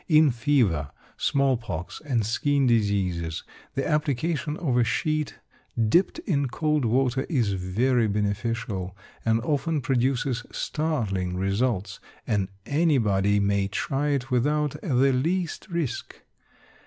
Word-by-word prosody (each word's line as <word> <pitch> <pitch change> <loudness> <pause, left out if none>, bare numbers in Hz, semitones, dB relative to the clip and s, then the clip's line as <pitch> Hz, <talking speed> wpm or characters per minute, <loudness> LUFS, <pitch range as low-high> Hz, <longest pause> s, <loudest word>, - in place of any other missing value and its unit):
In 155 -3 +5
fever, 115 - +1 0.3
small 135 -2 +2
pox, 90 -8 -6
and 125 -8 0
skin 140 +5 +1
diseases, 95 -8 +1 0.3
the 135 - -1
application 150 +1 0
of 140 -8 0
a 125 - +4
sheet 155 +5 -1 0.5
dipped 180 - +3
in 145 - +1
cold 150 +1 0
water 130 +3 +1
is 120 - +1
very 110 +6 +1
beneficial, 105 -2 -2 0.3
and 115 0 +2
often 150 +4 0
produces 130 -2 0
startling 105 - -1
results; 100 0 -1 0.3
and 100 -3 0 0.2
anybody 110 - +2
may 100 -1 +1
try 135 +7 -1
it 135 -3 -1
without 145 +3 +1
the 135 - +3
least 165 +9 -1
risk. 170 -7 -4
125 Hz, 115 wpm, -26 LUFS, 100-145 Hz, 0.5 s, In